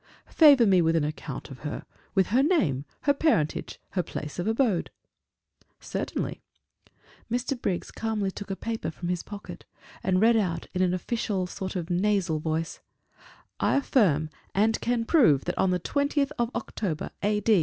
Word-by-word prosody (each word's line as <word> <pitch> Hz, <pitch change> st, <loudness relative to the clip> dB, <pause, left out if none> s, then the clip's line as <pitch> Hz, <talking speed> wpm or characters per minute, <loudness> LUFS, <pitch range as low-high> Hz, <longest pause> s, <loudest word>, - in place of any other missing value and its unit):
"Favor 285 Hz, -7 st, +7 dB
me 190 Hz, -3 st, +5 dB
with 165 Hz, 0 st, +2 dB
an 160 Hz, -, +2 dB
account 150 Hz, -2 st, -5 dB
of 130 Hz, -, -9 dB
her 150 Hz, -, -5 dB, 0.3 s
with 190 Hz, -2 st, +3 dB
her 245 Hz, +6 st, +4 dB
name, 175 Hz, -, +2 dB, 0.2 s
her 285 Hz, -, +3 dB
parentage, 275 Hz, -, 0 dB
her 185 Hz, -, +1 dB
place 150 Hz, -1 st, -6 dB
of 175 Hz, -, -1 dB
abode." 225 Hz, -5 st, +1 dB, 0.9 s
"Certainly." -, -, -4 dB, 0.9 s
Mr. 245 Hz, +2 st, -2 dB
Briggs 180 Hz, -3 st, -2 dB
calmly 215 Hz, -3 st, -2 dB
took 205 Hz, +1 st, -8 dB
a 195 Hz, -, -2 dB
paper 225 Hz, -6 st, -3 dB
from 175 Hz, +2 st, -6 dB
his 180 Hz, -1 st, -1 dB
pocket, 205 Hz, -1 st, -9 dB, 0.4 s
and 185 Hz, -1 st, +2 dB
read 230 Hz, +3 st, +5 dB
out 175 Hz, -7 st, 0 dB
in 185 Hz, -, 0 dB
a -, -, +5 dB, 0.3 s
sort 190 Hz, -3 st, -3 dB
of 175 Hz, -3 st, -2 dB
official, 175 Hz, -, -8 dB
nasal 185 Hz, -3 st, +1 dB
voice: 160 Hz, +1 st, -2 dB, 0.8 s
"I -, -, +2 dB
affirm 170 Hz, -, +2 dB, 0.2 s
and 220 Hz, +3 st, +2 dB
can 235 Hz, -1 st, 0 dB
prove 230 Hz, -, +4 dB
that 175 Hz, -, -2 dB
on 190 Hz, -, +3 dB
the 180 Hz, 0 st, +1 dB
20th 285 Hz, -, 0 dB
of 235 Hz, -1 st, +1 dB
October, 170 Hz, -8 st, -3 dB
A. 210 Hz, +1 st, +1 dB
195 Hz, 165 wpm, -27 LUFS, 165-230 Hz, 0.9 s, Favor